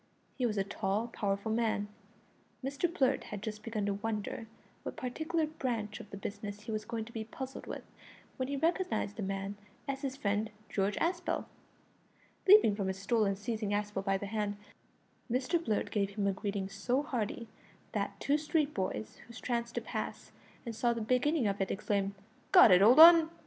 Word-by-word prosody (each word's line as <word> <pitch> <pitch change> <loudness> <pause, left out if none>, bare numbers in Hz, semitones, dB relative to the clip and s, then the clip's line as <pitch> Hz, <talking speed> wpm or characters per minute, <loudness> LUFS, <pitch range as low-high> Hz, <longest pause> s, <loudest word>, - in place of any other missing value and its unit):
He 250 -3 +1
was 215 -2 -2
a 195 - +2
tall, 200 +3 -1
powerful 200 0 -1
man. 220 -2 +1 0.8
Mr 285 +5 0
Blurt 270 -6 +1
had 210 -1 -6
just 215 -1 -5
begun 215 -2 -2
to 200 - +1
wonder 215 +2 -3 0.3
what - - -6
particular 315 +6 -1
branch 240 -9 -3
of 205 - -10
the 200 - -7
business 205 +1 -6
he 220 - -6
was 215 -1 -3
going 225 0 -3
to 235 - -12
be 225 -1 -4
puzzled 265 +4 -7
with, - - -5 0.5
when 255 - -1
he 280 - -2
recognised 330 - 0
the - - -3
man 195 +1 -3 0.3
as 275 -1 -3
his 270 -2 -3
friend 210 -4 0 0.2
George 195 +1 0
Aspel. 345 +1 -1 1.0
Leaping 380 - +8
from 200 -2 -2
his 190 0 -2
stool 215 +3 +2
and 195 -1 0
seizing 215 0 -2
Aspel 205 -1 -1
by 195 -1 +1
the 200 - -5
hand, 205 0 -2 0.7
Mr 260 +7 +1
Blurt 215 -6 -1
gave 200 -2 +1
him 205 -2 0
a 200 - +2
greeting 200 0 -3
so 220 +8 -1
hearty 235 -5 -3 0.4
that - - -2
two 290 +2 +2
street 300 -1 0
boys 110 - -3
who 235 - -12
chanced 235 -1 -2
to - - 0
pass - - -5 0.3
and 230 -2 -5
saw 235 +1 +2
the 230 - -4
beginning 255 +5 +2
of 200 -1 0
it 190 - 0
exclaimed, 200 -1 -1 0.4
"Go - - +10
it, 185 -4 +8
old 235 +8 +7
'un!" 330 -1 +10
220 Hz, 185 wpm, -32 LUFS, 200-260 Hz, 1.0 s, Go